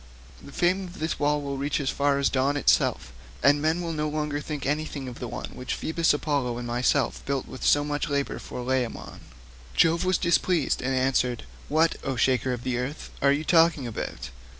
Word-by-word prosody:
The - - -12
fame 185 +5 +1
of 175 - -12
this 160 +1 -2
wall 145 0 +1
will 140 -1 -4
reach 140 +2 -1
as 140 -2 0
far 140 0 +1
as 140 -1 +2
dawn 135 +2 +1
itself, 60 - +2 0.3
and 145 +1 +5
men 160 +3 +1
will 165 -1 -3
no 150 -1 -1
longer 150 -1 -2
think 150 -2 -5
anything 145 -1 -2
of 125 - -8
the 125 - -4
one 120 - -6
which 125 - -4
Phoebus 165 +1 +1
Apollo 140 -5 -1
and 120 - -5
myself 120 +2 0
built 140 -1 -1
with 130 - -9
so 145 - +4
much 145 +2 -2
labour 140 -1 -1
for - - -7
Laomedon." 125 -2 -2 0.6
Jove 165 +2 +4
was 185 -1 +2
displeased 170 -2 +1
and 130 +1 0
answered, 130 -2 +1 0.3
"What, 160 +2 +3
O 135 - -2
shaker 130 +1 +2
of 120 -1 -4
the 125 -1 -1
earth, 135 +5 -5
are 140 - +5
you 145 +2 0
talking 165 -4 +4
about? 115 - -5
145 Hz, 200 wpm, -26 LUFS, 130-155 Hz, 0.6 s, and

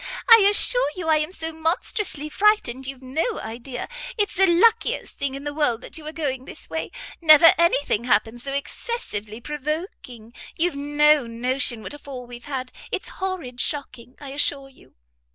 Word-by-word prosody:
I 460 - +10
assure - - +3
you 345 -3 -4
I 315 - +5
am 305 +3 -2
so 325 -3 -4
monstrously 320 - -2
frightened 305 - +1
you've 270 -1 -7
no 320 - -2
idea. 245 +3 -6 0.3
It's 415 -2 0
the 385 +1 +4
luckiest 440 +7 +2
thing 275 -1 -2
in 275 - -7
the 290 0 -4
world 290 -6 0
that - - -8
you 320 - -2
were 305 - -5
going 270 -5 -3
this 310 - -6
way. 320 - -3 0.3
Never 320 0 +8
any 340 -4 +3
thing 225 +3 0
happened 235 0 +1
so 275 - -4
excessively 275 - -4
provoking; 295 - -6 0.2
you've 340 -1 +1
no 295 -1 +3
notion 240 0 -1
what - - -7
a 290 - -10
fall 260 -3 -8
we've 240 0 -11
had. 260 -3 -5 0.2
It's - - -2
horrid 345 -11 -4
shocking, 250 -4 -4
I 280 - -8
assure 275 0 -1
you. 270 - -22
290 Hz, 175 wpm, -23 LUFS, 255-325 Hz, 0.3 s, I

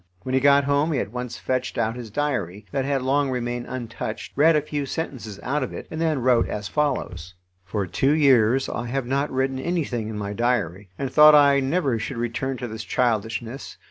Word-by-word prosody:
When 130 - -4
he 130 - +4
got 140 0 +5
home 145 +3 +1
he 135 - 0
at 105 - -3
once 125 0 -5
fetched 130 0 -2
out 115 0 0
his 120 -3 -7
diary, 105 - -2
that 135 -1 -1
had 135 -2 0
long 140 +1 +1
remained 120 -1 -3
untouched, 115 -3 -5
read 160 +3 +5
a 150 - +3
few 145 -2 -3
sentences 120 - -5
out 145 +4 -1
of 130 - -4
it, - - -7
and 160 - -4
then 155 -6 0
wrote 125 -2 +3
as 105 0 -4
follows: 90 - -2 0.3
"For 100 +2 -2
two 135 - +1
years 130 -4 +4
I 120 0 -4
have 135 +1 -2
not 140 +3 0
written 130 0 -1
anything 135 -9 -2
in 110 - -5
my 100 0 -4
diary, 105 -5 -1
and 135 -1 -3
thought 150 0 +8
I 140 -1 +6
never 135 -3 0
should 115 +4 -5
return 120 +3 -2
to 125 - -5
this 110 -1 -6
childishness. 115 +2 -2
130 Hz, 205 wpm, -24 LUFS, 115-140 Hz, 0.3 s, thought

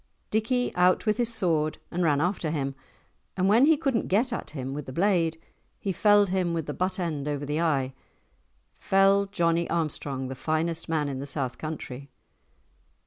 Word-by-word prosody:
Dickie 240 +4 0
out 180 +4 +3
with 215 -1 +2
his 240 -1 0
sword 160 -8 0
and 175 - -2
ran 145 -4 +3
after 175 0 0
him, 140 -3 -2 0.6
and 185 0 +2
when 225 +7 +6
he 315 0 +5
could 280 -3 0
not 230 - 0
get 230 +6 +1
at - - -4
him 135 -3 -5
with 145 0 -6
the - - -5
blade, 165 -1 +1 0.4
he 195 - -2
felled 205 +1 +4
him 180 -2 0
with 165 -2 -2
the 150 - -4
butt 185 +3 -2
end 155 -5 -2
over 145 -1 -2
the 150 +3 -1
eye, 135 -5 +1 0.9
felled 195 +1 +3
Johnie 170 -3 +1
Armstrong, 145 -5 -2
the 130 - -5
finest 160 +4 -2
man 155 -3 0
in 135 -2 -4
the 140 - -5
south 135 -3 -3
country. 140 -3 -6
165 Hz, 185 wpm, -27 LUFS, 145-195 Hz, 0.9 s, when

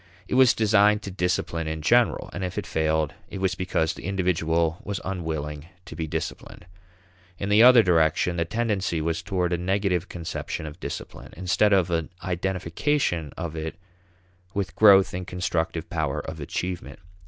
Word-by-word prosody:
It - - -4
was 130 -1 +6
designed 105 -1 +4
to 100 - -6
discipline 90 -3 -1
in 80 -1 -4
general, - - +2
and 95 - -4
if 90 - -4
it - - -2
failed, 80 -1 0 0.2
it - - -6
was 95 -1 0
because 85 -3 -1
the - - -10
individual 85 -3 0
was 100 -2 -3
unwilling 80 -5 -4 0.2
to 85 - -9
be 80 -1 -3
disciplined. 85 - -5 0.7
In 100 - -3
the 105 +2 +5
other 125 -1 +8
direction, 85 0 +2
the 85 - +1
tendency 105 -5 -1
was 80 +1 -1
towards 90 -3 -1
a 85 - 0
negative 95 -1 0
conception 85 -2 -5
of 75 +2 -9
discipline, - - -7
instead 95 +3 +2
of 95 -3 +3
an 80 -2 -1
identification 90 - -1
of 85 -3 -4
it 80 0 -4 0.8
with 100 -2 -2
growth 100 -3 +6
in 90 +1 -3
constructive 85 -3 -2
power 80 -4 -2
of 80 0 -7
achievement. 90 +4 -4
90 Hz, 165 wpm, -25 LUFS, 80-95 Hz, 0.8 s, other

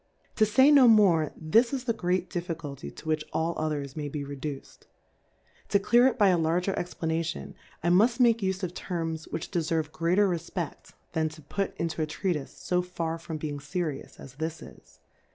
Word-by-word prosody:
To 215 - +5
fay 265 +7 +6
no 275 -4 +8
more^ 190 -9 +5
this 225 +10 +3
is 270 -3 -2
the 235 -3 0
great 185 -3 0
Difficulty 165 -6 -5
to - - -12
which 155 -1 0
all 165 +1 0
others 145 -3 -3
may 150 -2 -4
he 145 0 -4
reduced: 140 0 -7 0.8
To - - +4
clear 240 +5 +5
it 265 - 0
by 205 -4 +5
a 180 -2 +3
larger 175 +4 +1
ExvlapMion^ 160 - -3 0.3
Imuft 205 +9 +4
make 235 -2 +5
ufe 190 -1 -2
of 180 -1 -2
Terms 165 -4 -4
which 160 - -5
deferve 160 -3 -1
greater 180 +6 +2
Refpecfy 170 -2 -4 0.2
than 160 -1 0
to 155 0 -13
fut 195 +7 -3
into 165 -1 -2
a 155 - 0
Treatife^ 155 -3 -3
fo 180 0 +2
far 165 -2 -4
from 165 -1 -6
leing 150 -2 -4
ferious 150 0 -4
as 130 - -11
this 160 +1 -4
is. - - -16
165 Hz, 180 wpm, -28 LUFS, 155-195 Hz, 0.8 s, no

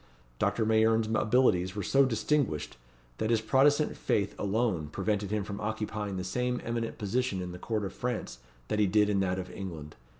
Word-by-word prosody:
Doctor 110 - +1
Mayerne's 110 0 +3
abilities 105 -6 +2
were 105 - -2
so 135 +8 +4
distinguished, 115 - 0 0.4
that 110 - 0
his 115 -1 +3
Protestant 145 +6 +3
faith 100 0 0
alone, 100 -6 0
prevented 100 +4 -1
him 105 0 -1
from 100 0 -6
occupying 105 -2 -3
the 90 - -3
same 125 +6 -1
eminent 115 -1 -3
position 110 0 -1
in 90 -1 -4
the 90 - -8
court 110 -1 -2
of 95 - -5
France 120 - -4 0.3
that 105 - 0
he 105 - +4
did 105 +1 +3
in 100 - +2
that 95 -1 0
of 95 -1 -5
England. 80 -6 -7
105 Hz, 180 wpm, -30 LUFS, 95-115 Hz, 0.4 s, so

